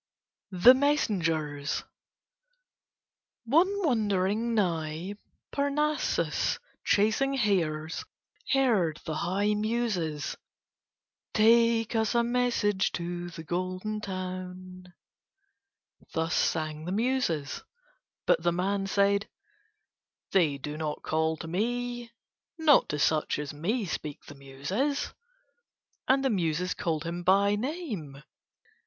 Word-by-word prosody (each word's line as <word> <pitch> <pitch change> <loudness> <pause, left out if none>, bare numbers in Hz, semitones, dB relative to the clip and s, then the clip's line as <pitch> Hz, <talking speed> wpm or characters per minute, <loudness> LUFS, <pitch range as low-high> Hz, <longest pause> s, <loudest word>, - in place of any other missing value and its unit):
THE 230 +8 +9
MESSENGERS 165 - 0 1.6
One 320 +10 +5 0.2
wandering 215 -2 +1
nigh 170 -2 -1 0.4
Parnassus 295 +2 0 0.3
chasing 220 +7 +2
hares 165 -9 0 0.5
heard 220 - +2
the 155 - -3
high 200 +4 +1
Muses. 210 -9 -1 1.0
"Take 230 +1 +4
us 220 +1 +1
a 235 - +4
message 235 -5 +1
to 175 0 -4
the 165 -1 -9
Golden 185 +5 -3
Town." 185 -1 -6 1.3
Thus 160 +1 0
sang 155 -1 0
the 180 - -3
Muses. 210 - 0 0.6
But - - +3
the 175 +1 +2
man 195 +3 -1
said: 200 +2 +2 1.0
"They 160 -7 +3
do 150 +2 -6
not 155 -1 -4
call 160 0 0
to 165 - -7
me. 240 +6 -2 0.5
Not 310 -4 +5
to 150 - -1
such 155 +1 +1
as 145 -1 -4
me 205 +10 -1
speak 155 -3 -5
the - - -10
Muses." 145 - -2 0.9
And 270 +1 +3
the 265 - +3
Muses 180 -2 0
called 160 -3 -2
him 170 +1 -4
by 200 +3 +4
name. 210 - -5
190 Hz, 100 wpm, -28 LUFS, 160-235 Hz, 1.6 s, THE